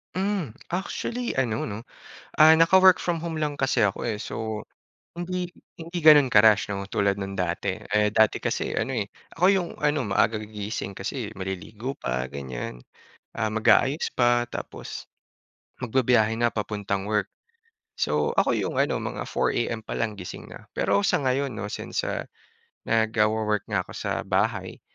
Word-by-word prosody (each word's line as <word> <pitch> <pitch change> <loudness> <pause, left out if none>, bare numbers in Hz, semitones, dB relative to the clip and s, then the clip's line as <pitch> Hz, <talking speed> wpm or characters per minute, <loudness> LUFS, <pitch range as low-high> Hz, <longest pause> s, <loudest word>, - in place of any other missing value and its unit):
Mm, 190 - -1 0.2
actually 235 +6 -3
ano 110 -4 -1
'no 105 +1 -5 0.6
ah, 155 +1 +8
naka-work 185 +3 +6
from 175 -1 0
home 160 -1 -4
lang 150 -1 -1
kasi 130 -2 +1
ako, 105 -2 +1
eh. 110 -3 -2
So 110 -2 -5 0.4
hindi 175 +1 -4 0.2
hindi 170 +1 -6
ganon 150 -5 +7
ka-rush 105 -1 +5
'no 100 0 -5
tulad 100 -1 0
nang 95 0 -5
dati. 90 +1 -1 0.2
Eh 105 0 +4
dati 110 0 +3
kasi - - -2
ano, - - -1
eh, - - 0 0.3
ako 175 - +1
yung 185 -3 +1
ano 150 0 +1
maaga 110 +2 +2
gigising 105 -2 -5
kasi 110 +2 -4
maliligo 100 +6 -5
pa 65 0 -1
ganyan, 65 -2 -6 0.5
ah 110 -2 -1
mag-aayos 110 +7 +3
pa 120 -1 +3
tapos 120 - -7 0.7
magbibiyahe 120 -3 +2
na 120 0 +1
papuntang 100 -2 -2
work. 105 -2 +1 0.7
So - - +1
ako - - +2
yung - - -1
ano - - +2
mga - - -4
4 - - 0
AM 115 -1 -2
palang 110 -1 -2
gising 90 -2 -8
na. - - -11
Pero 100 +1 +1
sa - - +2
ngayon 135 0 0
'no 105 - -5
since, - - -3
ah, - - -2 0.6
nagwo-work 110 -1 +1
nga 95 -3 0
ako - - -10
sa - - -2
bahay, - - -1
110 Hz, 155 wpm, -25 LUFS, 105-145 Hz, 0.7 s, ah